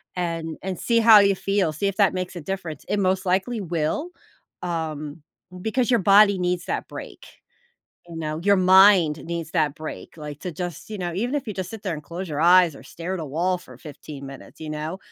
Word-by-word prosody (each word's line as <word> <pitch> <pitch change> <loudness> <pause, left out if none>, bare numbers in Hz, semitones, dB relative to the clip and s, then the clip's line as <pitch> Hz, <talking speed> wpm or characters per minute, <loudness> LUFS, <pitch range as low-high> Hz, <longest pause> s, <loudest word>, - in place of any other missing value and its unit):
and 165 -3 -3
and 190 -1 -4
see 235 -1 +2
how 225 -2 +8
you 200 -1 +4
feel, 195 -4 0
see 175 +7 -1
if 195 -1 -3
that 200 -2 +4
makes 185 0 -4
a 175 - -6
difference 175 -2 -5
it 205 - +1
most 190 -1 +1
likely 190 +6 0
will, 175 - -2 0.5
um, 160 -3 -4 0.4
because 240 +3 0
your 240 - +4
body 200 +1 +6
needs 180 -1 -1
that - - -3
break, - - -9 0.8
you 170 - -9
know, 155 -1 -4
your 200 0 +5
mind 185 -5 +5
needs 165 -1 -5
that 155 -5 +1
break, 155 +1 -8
like 150 -1 -7
to 180 - -5
just, 175 +3 -6
you 210 - -5
know 175 -2 -3
even 240 +9 -2
if 290 - -2
you 210 - -4
just 185 -1 -5
sit 225 -2 -8
there 185 -5 -2
and 150 - -8
close 175 +5 -6
your 150 -1 -3
eyes 175 -3 +5
or - - -13
stare 170 +3 -5
at 185 - -4
a - - -4
wall 170 +6 0
for 130 -8 -15
15 140 0 -10
minutes, 135 0 -12
you 160 - -6
know? 155 +4 -4
180 Hz, 220 wpm, -24 LUFS, 155-195 Hz, 0.8 s, how